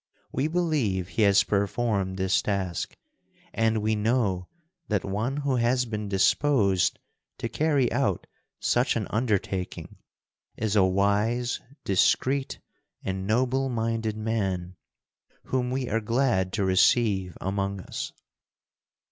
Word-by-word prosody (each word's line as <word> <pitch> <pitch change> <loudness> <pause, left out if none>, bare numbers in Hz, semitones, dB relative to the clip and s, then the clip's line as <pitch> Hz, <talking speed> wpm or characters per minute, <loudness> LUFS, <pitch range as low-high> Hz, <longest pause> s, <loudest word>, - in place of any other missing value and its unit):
We 140 - 0
believe 145 - 0
he 115 - -2
has 100 -1 +5
performed 100 -1 0
this 95 0 +2
task, 95 -4 -2 0.6
and 110 -1 +1
we 110 +1 +2
know 105 -5 0 0.4
that 105 -4 0
one 110 +8 -2
who 140 -3 0
has 125 +2 +2
been 105 -3 -4
disposed 100 - +2 0.4
to - - -3
carry 145 -6 +1
out - - 0 0.3
such - - +2
an - - -1
undertaking 100 -5 -2 0.6
is 110 -1 -1
a 100 - +6
wise, 105 +6 +1 0.2
discreet, 130 +8 +1 0.5
and 95 0 -3
noble 130 +4 +1
minded 115 -2 -1
man, 95 -5 -2 0.7
whom 125 -1 -1
we 130 0 -2
are 115 +1 0
glad 115 -5 +1
to 100 - 0
receive 95 0 +3
among 100 0 -2
us." - - -5
105 Hz, 120 wpm, -26 LUFS, 95-125 Hz, 0.7 s, a